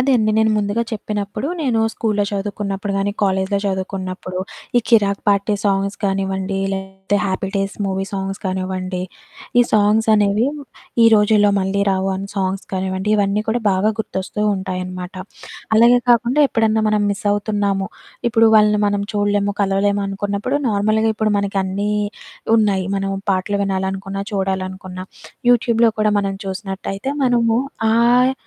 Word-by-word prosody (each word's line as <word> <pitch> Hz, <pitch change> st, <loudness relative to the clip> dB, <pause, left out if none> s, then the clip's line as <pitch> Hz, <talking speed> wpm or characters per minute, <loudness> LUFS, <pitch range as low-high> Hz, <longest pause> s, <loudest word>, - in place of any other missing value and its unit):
అదే 265 Hz, +2 st, +2 dB
అండి, 215 Hz, -1 st, +2 dB
నేను 220 Hz, 0 st, +3 dB
ముందుగా 210 Hz, +2 st, 0 dB
చెప్పినప్పుడు, 210 Hz, +1 st, -4 dB
నేను 245 Hz, -7 st, +1 dB
స్కూలులో 210 Hz, -2 st, 0 dB
చదువుకున్నప్పుడు 200 Hz, 0 st, -3 dB
కానీ 200 Hz, +1 st, 0 dB
కాలేజిలో 190 Hz, 0 st, +1 dB
చదువుకున్నప్పుడు 190 Hz, -1 st, -4 dB, 0.4 s
ఈ -, -, +2 dB
'కిరాక్ 200 Hz, -4 st, +3 dB
పార్టీ' 200 Hz, +1 st, +2 dB
సాంగ్స్ 195 Hz, 0 st, 0 dB
కానివ్వండి, 195 Hz, 0 st, -1 dB
లేకపోతే 190 Hz, +1 st, -3 dB
'హ్యాపీ 190 Hz, 0 st, -2 dB
డేస్' 195 Hz, 0 st, -2 dB
మూవీ 190 Hz, 0 st, -1 dB
సాంగ్స్ 195 Hz, 0 st, -4 dB
కానివ్వండి, 185 Hz, -1 st, -3 dB, 0.6 s
ఈ -, -, +7 dB
సాంగ్స్ 215 Hz, +1 st, +3 dB
అనేవి, 210 Hz, +2 st, +2 dB, 0.6 s
ఈ -, -, +8 dB
రోజుల్లో 210 Hz, -1 st, +4 dB
మళ్ళీ 195 Hz, +1 st, 0 dB
రావు 190 Hz, 0 st, 0 dB
అని 195 Hz, +1 st, -6 dB
సాంగ్స్ 190 Hz, 0 st, -1 dB
కానివ్వండి, 190 Hz, +2 st, -2 dB
ఇవన్నీ 205 Hz, 0 st, +1 dB
కూడా 235 Hz, +2 st, +1 dB
బాగా 190 Hz, +3 st, +2 dB
గుర్తొస్తూ 210 Hz, -1 st, -4 dB
ఉంటాయనమాట. 185 Hz, -1 st, -5 dB, 0.6 s
అలాగే 235 Hz, +2 st, +6 dB
కాకుండా 240 Hz, +4 st, +3 dB
ఎప్పుడన్నా 220 Hz, -2 st, +1 dB
మనం 210 Hz, -1 st, +2 dB
మిస్ 200 Hz, +1 st, -4 dB
అవుతున్నాము, 205 Hz, -2 st, -1 dB, 0.4 s
ఇప్పుడు 225 Hz, -1 st, +5 dB
వాళ్ళని 210 Hz, -1 st, +4 dB
మనం 205 Hz, 0 st, 0 dB
చూడలేము, 205 Hz, 0 st, +1 dB
కలవలేము 200 Hz, +1 st, +1 dB
అనుకున్నప్పుడు 200 Hz, +6 st, -2 dB
నార్మల్‌గా 215 Hz, +1 st, +2 dB
ఇప్పుడు 215 Hz, -1 st, +1 dB
మనకి 200 Hz, 0 st, -1 dB
అన్నీ 200 Hz, +2 st, -2 dB, 0.6 s
ఉన్నాయి, 200 Hz, -4 st, +2 dB
మనం 195 Hz, 0 st, -2 dB, 0.2 s
పాటలు 195 Hz, +2 st, -1 dB
వినాలనుకున్నా, 195 Hz, 0 st, -3 dB
చూడాలనుకున్న, 190 Hz, -1 st, -3 dB, 0.5 s
యూట్యూబ్‌లో 235 Hz, -1 st, +3 dB
కూడా 215 Hz, 0 st, +3 dB
మనం 195 Hz, -1 st, -2 dB
చూసినట్టయితే 195 Hz, +4 st, -4 dB
మనము 235 Hz, -2 st, +2 dB, 0.4 s
ఆహ్, 245 Hz, +3 st, +4 dB
200 Hz, 135 wpm, -19 LUFS, 190-215 Hz, 0.6 s, ఈ